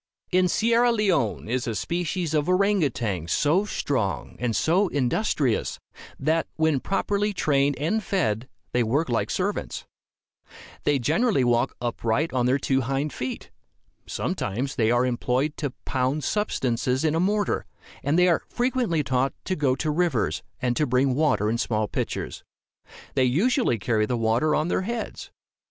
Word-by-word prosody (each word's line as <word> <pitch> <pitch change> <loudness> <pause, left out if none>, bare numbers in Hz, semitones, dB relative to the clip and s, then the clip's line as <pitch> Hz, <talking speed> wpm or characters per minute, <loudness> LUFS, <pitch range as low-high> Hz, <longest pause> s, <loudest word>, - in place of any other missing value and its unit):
In 185 0 +4
Sierra 235 +5 +3
Leone 180 - +1
is 125 +3 -1
a 115 - -2
species 175 - -2
of 150 +1 +1
orang 200 +2 +3
outang 105 - -2
so 160 - +2
strong 130 - -2
and 120 -2 -1
so 185 +5 +3
industrious, 140 - 0 0.4
that, 160 +3 +1
when 160 -3 +2
properly 205 +5 0
trained 140 -5 +1
and 170 +10 0
fed, 125 - -1 0.2
they 125 - +2
work 130 +7 +1
like 115 -2 0
servants. - - -2 1.0
They 145 - +3
generally 155 - +2
walk 120 +1 +1
upright 120 +5 -1
on 125 -1 +2
their 130 +2 +3
two 135 -1 +1
hind 135 +3 -2
feet. 130 0 -5 0.6
Sometimes 125 +8 -2
they 110 -5 +2
are 120 +1 +3
employed 130 +4 0
to 145 - -2 0.2
pound 130 +3 0
substances 130 - 0
in 155 - +2
a 165 - +1
mortar, 205 +3 0 0.3
and 145 +4 +1
they 180 0 +5
are 170 - +3
frequently 240 - 0
taught 130 0 0
to 185 - -1
go 140 -5 +1
to 155 +2 -1
rivers, 175 +2 0 0.2
and 125 -1 0
to 150 - +2
bring 130 +1 +2
water 145 -7 +2
in 115 +2 0
small 110 -2 0
pitchers. - - -4 0.7
They 130 - +3
usually 190 - +2
carry 110 0 0
the 125 - -1
water 115 +7 +2
on 155 - +1
their 180 - 0
heads. 230 +4 -5
140 Hz, 155 wpm, -25 LUFS, 125-180 Hz, 1.0 s, they